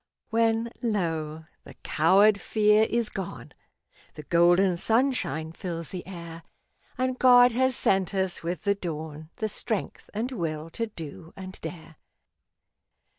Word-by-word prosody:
When, 225 Hz, 0 st, +2 dB
lo! 160 Hz, -8 st, -2 dB, 0.2 s
the -, -, -13 dB
coward 200 Hz, +6 st, +4 dB
fear 215 Hz, 0 st, +3 dB
is 235 Hz, -1 st, 0 dB
gone 190 Hz, -4 st, -7 dB, 0.6 s
The 150 Hz, -, -8 dB
golden 175 Hz, +3 st, +4 dB
sunshine 220 Hz, -, 0 dB
fills 165 Hz, -1 st, -6 dB
the 180 Hz, -2 st, -7 dB
air, 170 Hz, -3 st, -8 dB, 0.6 s
And 255 Hz, 0 st, -1 dB
God 245 Hz, -1 st, +7 dB
has 260 Hz, +2 st, +1 dB
sent 195 Hz, -2 st, +1 dB
us 190 Hz, -2 st, -1 dB
with 170 Hz, -1 st, -4 dB
the 200 Hz, -, +3 dB
dawn 160 Hz, -4 st, -6 dB
The 220 Hz, -, -2 dB
strength 215 Hz, 0 st, -4 dB
and 230 Hz, +5 st, -3 dB
will 165 Hz, -7 st, -4 dB
to 230 Hz, +5 st, -3 dB
do 165 Hz, -3 st, -9 dB
and 190 Hz, -1 st, -9 dB
dare. 160 Hz, -3 st, -8 dB
190 Hz, 130 wpm, -27 LUFS, 165-225 Hz, 0.6 s, God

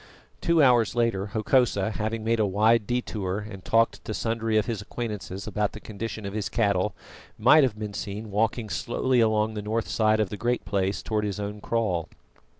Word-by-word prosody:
Two 170 Hz, -3 st, +4 dB
hours 120 Hz, -4 st, +4 dB
later, 115 Hz, -5 st, +1 dB
Hokosa, 110 Hz, -1 st, +1 dB
having 110 Hz, +1 st, -3 dB
made 115 Hz, +1 st, +1 dB
a 110 Hz, -, +3 dB
wide 105 Hz, +3 st, +3 dB
detour 105 Hz, -6 st, -2 dB
and 95 Hz, -3 st, -9 dB
talked 115 Hz, 0 st, +2 dB
to 110 Hz, -, -4 dB
sundry 115 Hz, -1 st, 0 dB
of 105 Hz, -, +2 dB
his 115 Hz, -4 st, -3 dB
acquaintances 105 Hz, -3 st, -5 dB
about 105 Hz, -1 st, -1 dB
the 110 Hz, -, -8 dB
condition 110 Hz, 0 st, -6 dB
of 100 Hz, -, -5 dB
his 105 Hz, -1 st, -2 dB
cattle, 100 Hz, -3 st, +1 dB, 0.4 s
might 130 Hz, +8 st, +6 dB
have 125 Hz, -6 st, +1 dB
been 105 Hz, -1 st, -5 dB
seen 105 Hz, +2 st, -5 dB
walking 110 Hz, +2 st, 0 dB
slowly 120 Hz, +6 st, 0 dB
along 110 Hz, -1 st, +2 dB
the 105 Hz, -, -4 dB
north 110 Hz, +2 st, -2 dB
side 110 Hz, -1 st, +2 dB
of 105 Hz, -3 st, +1 dB
the 105 Hz, -, -5 dB
Great 120 Hz, +1 st, -1 dB
Place 100 Hz, -1 st, -1 dB
towards 105 Hz, -1 st, -1 dB
his 100 Hz, 0 st, -4 dB
own 105 Hz, +1 st, -4 dB
kraal. 100 Hz, -9 st, -1 dB
110 Hz, 190 wpm, -26 LUFS, 100-115 Hz, 0.4 s, might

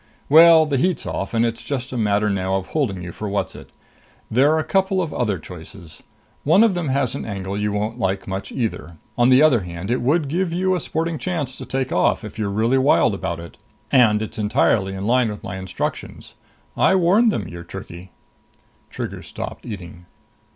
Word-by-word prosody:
Well, 160 Hz, +1 st, +8 dB
the 145 Hz, -2 st, -1 dB
heat's 175 Hz, +2 st, 0 dB
off, 95 Hz, -, -3 dB
and 115 Hz, 0 st, +2 dB
it's 115 Hz, -1 st, -3 dB
just 135 Hz, -2 st, -4 dB
a -, -, -5 dB
matter 105 Hz, -1 st, +1 dB
now 95 Hz, -2 st, 0 dB
of 95 Hz, -1 st, -3 dB
holding 105 Hz, -, -1 dB
you 85 Hz, -, -6 dB
for 105 Hz, +4 st, -5 dB
Whatzzit. 100 Hz, 0 st, -4 dB, 0.6 s
There're 140 Hz, +7 st, +4 dB
a 155 Hz, -, 0 dB
couple 190 Hz, 0 st, +1 dB
of 165 Hz, -5 st, -2 dB
other 105 Hz, -5 st, 0 dB
choices. 85 Hz, 0 st, -11 dB, 0.4 s
One 175 Hz, +9 st, +5 dB
of 225 Hz, -4 st, +3 dB
them 175 Hz, -5 st, -2 dB
has 130 Hz, -2 st, 0 dB
an -, -, -5 dB
angle 100 Hz, -2 st, -5 dB
you 105 Hz, 0 st, -1 dB
won't 105 Hz, +4 st, -3 dB
like 95 Hz, -1 st, -1 dB
much 95 Hz, 0 st, -5 dB
either. 95 Hz, -, -4 dB, 0.2 s
On 120 Hz, 0 st, +3 dB
the 130 Hz, +3 st, +6 dB
other 145 Hz, -7 st, +5 dB
hand, 90 Hz, +2 st, -6 dB
it 125 Hz, -, 0 dB
would 145 Hz, +5 st, +1 dB
give 170 Hz, +4 st, -1 dB
you 185 Hz, +2 st, +1 dB
a 180 Hz, -, 0 dB
sporting 165 Hz, +1 st, -3 dB
chance 155 Hz, -8 st, -3 dB
to -, -, -8 dB
take 130 Hz, -1 st, -2 dB
off 90 Hz, -, +2 dB
if 110 Hz, +1 st, -9 dB
you're 105 Hz, -2 st, -1 dB
really 115 Hz, +6 st, +2 dB
wild 130 Hz, -5 st, +3 dB
about 85 Hz, -3 st, -3 dB
it. 85 Hz, 0 st, -11 dB, 0.3 s
And 110 Hz, -5 st, +4 dB
it's 110 Hz, -, -7 dB
entirely 105 Hz, -2 st, +1 dB
in 95 Hz, +1 st, -5 dB
line 120 Hz, 0 st, +3 dB
with 105 Hz, -1 st, -7 dB
my 95 Hz, -, -5 dB
instructions. 95 Hz, -1 st, -5 dB, 0.4 s
I -, -, +3 dB
warned 195 Hz, +6 st, +4 dB
them 100 Hz, -, -3 dB
you're 85 Hz, 0 st, -8 dB
tricky." 90 Hz, 0 st, -9 dB, 0.8 s
Trigger -, -, -6 dB
stopped -, -, -8 dB
eating. 90 Hz, -5 st, -9 dB
115 Hz, 200 wpm, -21 LUFS, 95-150 Hz, 0.8 s, Well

